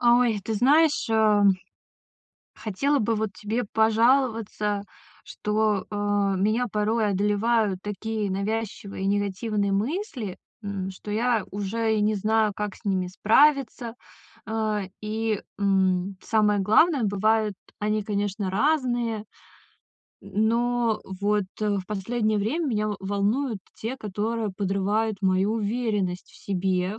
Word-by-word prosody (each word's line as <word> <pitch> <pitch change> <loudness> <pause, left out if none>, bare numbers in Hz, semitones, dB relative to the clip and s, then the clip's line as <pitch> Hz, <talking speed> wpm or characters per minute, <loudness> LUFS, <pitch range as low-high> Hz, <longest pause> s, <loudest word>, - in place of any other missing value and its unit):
Ой, 240 -3 +4
ты 225 - -2
знаешь, 290 +7 +3
ам, 210 -2 +5 1.0
хотела 275 +8 0
бы 225 +1 +1
вот 215 -1 -1
тебе 215 +5 -2
пожаловаться, 225 -2 +2 0.4
что, 210 -1 0
а, 205 -1 0
меня 215 +6 +1
порой 215 +1 +1
одолевают 205 0 +1
такие 210 +1 -3
навязчивые 200 0 -3
и - - 0
негативные 205 +1 0
мысли, 240 - -2 0.3
м, 195 -2 -3
что 200 +2 -8
я 230 0 +1
уже 220 +3 -1
и - - +1
не 210 +1 +2
знаю, 215 +1 +2
как 210 -2 -3
с - - -20
ними 190 -2 0
справиться. 240 +4 +2 0.5
А, 215 -2 -1 0.2
и, 215 0 -1 0.2
м, 190 -1 +1
самое 210 -2 +2
главное, 250 - +4
бывает, 215 +1 +2 0.3
они, 210 0 0
конечно, 205 -1 -2
разные. 240 -2 0 1.0
М, 200 +2 0
но 235 -1 +1
вот, 205 +2 0 0.2
э, 210 -1 +1
в 185 - -7
последнее 215 +2 -1
время 280 +12 -1
меня 215 -5 0
в 210 - -2
волнуют 205 +5 0 0.2
те, 235 +4 -4
которые 215 0 -2
подрывают 200 +2 0
мою 190 +2 +2
уверенность 210 -4 -1
в - - -18
себе. 185 +1 -1
210 Hz, 125 wpm, -25 LUFS, 200-225 Hz, 1.0 s, ам